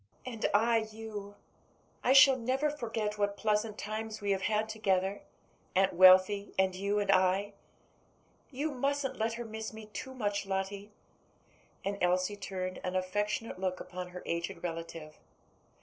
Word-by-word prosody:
"And 235 -4 -2
I 225 +1 +3
you. 210 -2 -7 0.7
I 250 - +3
shall 270 0 +9
never 260 +4 0
forget 225 -6 -3
what 205 0 0
pleasant 210 0 0
times 220 +1 -4
we 205 -1 -1
have 190 -1 +1
had 215 +2 +1
together; 200 -3 0 0.5
Aunt 190 0 +3
Wealthy 185 +3 +6
and 190 -1 +3
you 200 +2 -1
and 200 -1 +2
I. 190 +2 +2 1.0
You 295 +3 -2
musn't 275 +1 -1
let 225 +1 0
her 235 +1 -5
miss 220 0 -6
me 220 0 -9
too 260 +6 -6
much, 205 -4 -2
Lottie." 195 +2 -3 0.9
And 200 0 -2
Elsie 180 +3 +2
turned 185 -2 -5
an 185 0 -3
affectionate 205 +3 -2
look 185 -1 -2
upon 180 0 -6
her 180 0 -9
aged 170 +1 -3
relative. 165 -2 -6
205 Hz, 150 wpm, -31 LUFS, 185-220 Hz, 1.0 s, shall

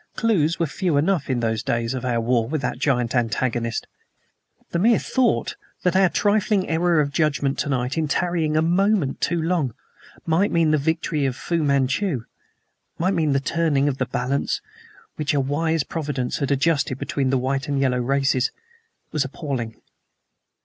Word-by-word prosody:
Clews 175 -8 +2
were 170 - +1
few 165 0 -1
enough 160 0 +1
in 125 -2 0
those 110 -1 0
days 115 +1 -1
of 130 - -4
our 120 -2 0
war 115 0 +1
with 155 -1 -1
that - - -2
giant 125 -5 +1
antagonist. 115 -1 -1 0.9
The 170 - 0
mere 225 +4 +5
thought 255 -3 0 0.3
that 180 0 +2
our 190 -1 +5
trifling 205 0 +1
error 165 0 +2
of 140 -1 +1
judgment 145 -3 0
tonight 130 0 -1
in 155 - 0
tarrying 160 0 0
a 155 - +3
moment 180 -3 +1
too 170 0 +1
long 160 -7 0 0.5
might 170 +6 +2
mean 165 -2 +3
the 155 - +3
victory 155 -1 0
of 130 - -2
Fu 170 +4 -1
Manchu, 140 - +1 0.7
might 185 +4 +1
mean 155 -5 +1
the 135 - +3
turning 145 -1 +1
of 135 -2 -1
the 130 - 0
balance 125 +3 -1 0.6
which 150 -1 0
a - - +3
wise 155 +3 0
providence 140 -6 -3
had 140 - -1
adjusted 140 -1 +1
between 135 -1 -1
the 135 - +2
white 135 +1 -1
and 140 -1 0
yellow 130 -2 +1
races, 135 0 +1 0.6
was 155 -3 +1
appalling. 130 -6 -5
145 Hz, 170 wpm, -23 LUFS, 130-165 Hz, 0.9 s, mere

